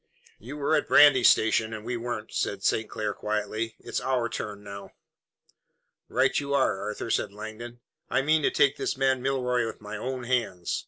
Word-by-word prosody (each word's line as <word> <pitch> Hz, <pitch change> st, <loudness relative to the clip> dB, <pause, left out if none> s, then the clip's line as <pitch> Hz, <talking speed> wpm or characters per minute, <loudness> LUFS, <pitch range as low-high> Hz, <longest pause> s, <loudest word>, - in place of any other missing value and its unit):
"You 130 Hz, +7 st, -8 dB
were 145 Hz, +2 st, 0 dB
at 150 Hz, -, 0 dB
Brandy 140 Hz, -4 st, +7 dB
Station, 110 Hz, 0 st, +4 dB
and 110 Hz, 0 st, -9 dB
we 120 Hz, +1 st, -2 dB
weren't," 115 Hz, -2 st, -5 dB
said -, -, -2 dB
St. 110 Hz, -, +1 dB
Clair 105 Hz, -1 st, -3 dB
quietly. 110 Hz, +2 st, -3 dB
"It's -, -, -4 dB
our 125 Hz, -3 st, 0 dB
turn 105 Hz, -2 st, -6 dB
now." 100 Hz, 0 st, -9 dB, 1.2 s
"Right -, -, +2 dB
you 140 Hz, 0 st, -2 dB
are, 105 Hz, -8 st, +1 dB
Arthur," 105 Hz, +2 st, -4 dB
said -, -, 0 dB
Langdon. 110 Hz, +3 st, -9 dB, 0.3 s
"I 135 Hz, -, +1 dB
mean 155 Hz, +2 st, +3 dB
to -, -, +3 dB
take 140 Hz, -, +2 dB
this -, -, -2 dB
man 130 Hz, -1 st, +2 dB
Milroy 125 Hz, -2 st, 0 dB
with -, -, -7 dB
my 105 Hz, 0 st, -7 dB
own 130 Hz, +3 st, -4 dB
hands. 115 Hz, -8 st, -1 dB
120 Hz, 180 wpm, -27 LUFS, 110-130 Hz, 1.2 s, Brandy